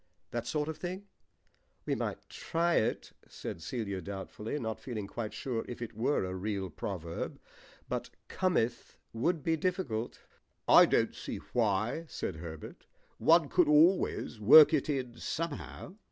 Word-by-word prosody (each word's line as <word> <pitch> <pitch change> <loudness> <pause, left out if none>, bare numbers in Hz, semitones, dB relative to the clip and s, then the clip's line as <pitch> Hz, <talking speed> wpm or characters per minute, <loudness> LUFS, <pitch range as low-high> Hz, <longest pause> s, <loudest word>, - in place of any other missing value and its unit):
That 120 0 -3
sort 150 -1 -1
of 160 - -5
thing." 185 +3 -5 0.8
"We - - 0
might - - -3
try 170 0 0
it," 115 +2 0 0.2
said 80 - -7
Celia 100 -1 -3
doubtfully, 100 - -5
not 110 -5 -3
feeling 110 -6 -5
quite 110 +1 -5
sure 115 +1 -3
if 120 - -7
it 120 -1 -6
were 120 0 +1
a 90 - -4
real 95 -1 -3
proverb; 85 -1 -5 0.5
"but - - -3 0.2
'cometh' 175 -11 -1 0.2
would 150 +7 0
be 165 - +2
difficult." 150 - -2 0.5
"I - - +8
don't - - +2
see - - -6 0.2
why," 110 +6 +1
said 80 - -4
Herbert. 80 -1 -9 0.3
"One 165 -2 +5
could 180 +2 +3
always 150 - +3
work 145 +10 +9
it 155 0 +1
in 125 -4 -2
somehow." 165 +4 -5
120 Hz, 145 wpm, -31 LUFS, 105-160 Hz, 0.8 s, work